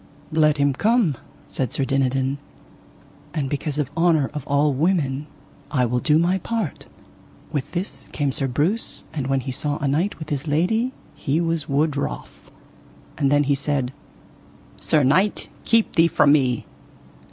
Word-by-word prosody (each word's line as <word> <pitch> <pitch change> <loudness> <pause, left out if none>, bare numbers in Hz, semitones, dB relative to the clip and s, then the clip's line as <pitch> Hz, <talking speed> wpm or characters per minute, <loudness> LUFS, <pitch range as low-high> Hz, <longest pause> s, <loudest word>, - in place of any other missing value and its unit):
Let 155 -1 +3
him 140 -1 +2
come, 215 - +2 0.3
said 130 -4 -3
Sir 135 - 0
Dinadan, 135 0 0 1.0
and 145 -4 0
because 145 0 -2
of 145 -2 -1
honour 165 -5 +3
of 150 -3 -6
all 145 +1 +2
women 150 -2 0 0.4
I 125 -3 +2
will 125 +1 0
do 150 +4 +3
my 175 +3 +2
part. 225 -6 -3 0.6
With 145 -4 -2
this 185 +3 -2
came 145 -2 0
Sir 135 0 -1
Breuse, 160 - 0
and 140 -4 -3
when 135 -1 +1
he 130 +1 -4
saw 145 +3 -1
a 145 - -2
knight 165 +9 0
with 155 -1 -8
his 145 +1 -3
lady 195 - +1 0.2
he 145 +3 -1
was 165 -3 -1
wood 145 +2 +1
wroth. 100 - -5 0.6
And 140 -2 +1
then 145 0 +4
he 140 0 +2
said: 140 -2 -1 0.9
Sir 150 -2 +2
knight, 185 +10 +2 0.2
keep 230 -1 +3
thee 165 0 +6
from 145 -3 +4
me. 130 -5 +2
145 Hz, 160 wpm, -23 LUFS, 135-165 Hz, 1.0 s, thee